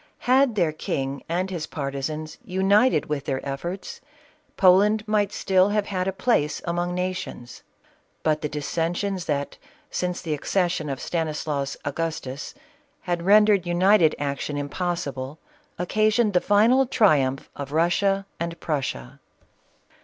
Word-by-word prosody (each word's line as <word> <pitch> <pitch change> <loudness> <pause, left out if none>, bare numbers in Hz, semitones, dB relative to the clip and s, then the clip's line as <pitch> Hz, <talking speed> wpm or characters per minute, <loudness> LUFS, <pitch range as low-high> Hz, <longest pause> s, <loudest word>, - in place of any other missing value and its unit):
Had 255 -1 +4
their 170 -6 +2
king 140 -2 -3
and 180 +3 -1
his 170 -4 -4
partisans 145 +2 -4
united 195 - +3
with 145 -2 -3
their 135 +1 -3
efforts, 170 +8 -5 0.6
Poland 205 +4 +4
might 210 -1 +1
still 190 -1 +2
have 210 0 +1
had 185 -2 -2
a - - +1
place 190 -7 +1
among 175 0 -1
nations; 180 -9 -4 0.6
but 155 -1 +1
the 150 - -2
dissensions 170 +5 -2
that, 140 -1 -2 0.3
since 180 0 -2
the 160 -3 -3
accession 170 0 -1
of 135 -1 -3
Stanislaus 150 -4 -2
Agustus, 145 -2 -4 0.5
had 175 -2 -2
rendered 205 0 +5
united 175 -1 +4
action 145 0 -3
im 145 0 -3
possible, 145 -6 -3 0.4
occasioned 215 +4 +2
the 180 - +3
final 235 +6 +4
triumph 135 - +2
of 140 -1 -6
Russia 195 +5 +2
and 170 0 -4
Prussia. 140 -3 -3
175 Hz, 130 wpm, -24 LUFS, 150-195 Hz, 0.6 s, rendered